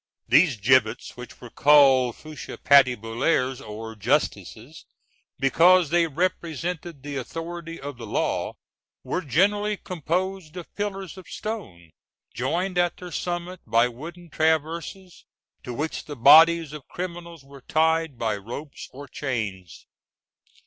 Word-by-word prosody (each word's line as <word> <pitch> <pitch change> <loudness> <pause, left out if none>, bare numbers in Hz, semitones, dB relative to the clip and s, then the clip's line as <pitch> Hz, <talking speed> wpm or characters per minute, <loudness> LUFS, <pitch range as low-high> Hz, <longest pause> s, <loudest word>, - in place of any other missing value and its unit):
These 155 -6 +4
gibbets, 110 +1 +2
which 125 0 -11
were 120 -2 -11
called 135 -4 +5
fourches 155 -1 -9
patibulaires 130 0 +3
or 110 +1 -8
justices, 115 - -2 0.5
because 170 +4 +4
they 170 -1 +3
represented 170 -1 -3
the 145 -1 -5
authority 165 +4 -6
of 140 -2 -7
the 115 -2 -8
law, - - -1 0.5
were 180 - -2
generally 205 +8 +1
composed 180 -1 -3
of 175 - -9
pillars 195 -4 -5
of 185 - -14
stone, 105 - -7 0.4
joined 180 +9 -1
at 175 -1 +1
their 180 -1 -9
summit 175 +1 -4
by 115 +1 +4
wooden 165 +7 -10
traverses, 160 +4 -2 0.4
to 125 - -7
which 150 +6 -4
the 145 - -7
bodies 160 +4 +6
of 150 -3 -10
criminals 170 -3 -7
were 140 0 -14
tied 160 -1 +1
by 110 -2 -1
ropes 125 +9 -8
or 140 +2 -10
chains. 105 - -5
155 Hz, 125 wpm, -24 LUFS, 125-175 Hz, 0.5 s, bodies